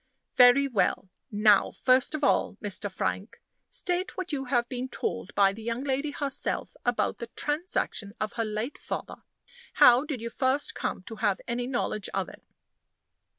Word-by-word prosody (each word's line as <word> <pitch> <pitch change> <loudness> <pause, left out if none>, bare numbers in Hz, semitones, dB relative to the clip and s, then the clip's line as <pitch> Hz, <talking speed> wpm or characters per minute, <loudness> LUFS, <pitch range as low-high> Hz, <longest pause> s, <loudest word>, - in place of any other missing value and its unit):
Very 250 +3 +7
well. 195 -5 0 0.2
Now, 210 -1 +4
first 255 +3 +2
of 300 - -5
all, 275 - +2
Mr. 205 0 -3
Frank, 195 +2 -3 0.3
state 365 -6 -2
what 370 -2 -4
you 270 -2 -2
have 240 -2 +1
been 255 0 -4
told 205 - -3
by 195 -1 +4
the 220 - -10
young 230 +2 -3
lady 280 +2 -1
herself 285 -1 -1
about 245 -1 0
the 235 - -5
transaction 295 - -2
of 215 - -2
her 230 - -1
late 215 +6 -4
father. - - -5 0.6
How 245 +2 +7
did 290 -5 -4
you 230 +1 -5
first 270 +3 0
come - - -3
to 220 +3 -9
have 205 -2 +1
any 245 +1 -2
knowledge 240 -5 -2
of - - -1
it?" - - -14
245 Hz, 165 wpm, -28 LUFS, 215-280 Hz, 0.6 s, Very